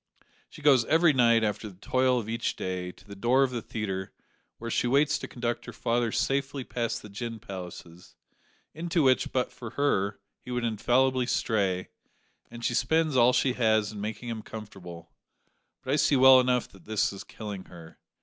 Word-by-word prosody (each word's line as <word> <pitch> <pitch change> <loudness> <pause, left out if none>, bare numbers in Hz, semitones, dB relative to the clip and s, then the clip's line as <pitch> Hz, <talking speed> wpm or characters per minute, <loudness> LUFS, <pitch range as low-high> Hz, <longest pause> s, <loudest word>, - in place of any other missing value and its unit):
She 155 - -14
goes 135 -5 +6
every 160 +2 +4
night, 115 -3 +4
after 105 0 -2
the 95 - -15
toil 130 +6 +1
of 110 - -6
each 115 +1 -2
day, 90 -1 -4
to - - -21
the 100 -1 -10
door 120 +7 +3
of 130 - 0
the 120 -2 -3
theatre, 95 -4 -4 0.5
where 115 0 -6
she 120 - +1
waits 140 +4 +3
to - - -6
conduct 120 -1 -3
her - - -6
father 120 -1 0
safely 135 +2 -1
past 120 -2 -3
the - - -9
gin 115 +3 -5
palaces, 90 -4 -10 0.6
into 165 +1 0
which, 130 -1 +3
but 130 -1 0
for 125 -2 -8
her, 100 -9 +1 0.2
he - - -13
would 125 -1 -2
infallibly 125 +3 +2
stray, 95 -7 0 0.6
and 120 0 -7
she - - +1
spends 160 +3 +1
all 125 0 +6
she 130 0 +2
has 110 -3 +2
in 105 -2 -7
making 110 +3 -5
him 115 -1 -4
comfortable, 90 -8 -10 0.7
but 130 - -1
I - - +3
see 145 - +3
well 130 0 +8
enough 125 -1 +1
that 95 -3 -18
this 110 -2 0
is 100 - -8
killing 105 -4 -8
her. 85 -2 -14
115 Hz, 190 wpm, -28 LUFS, 105-130 Hz, 0.7 s, well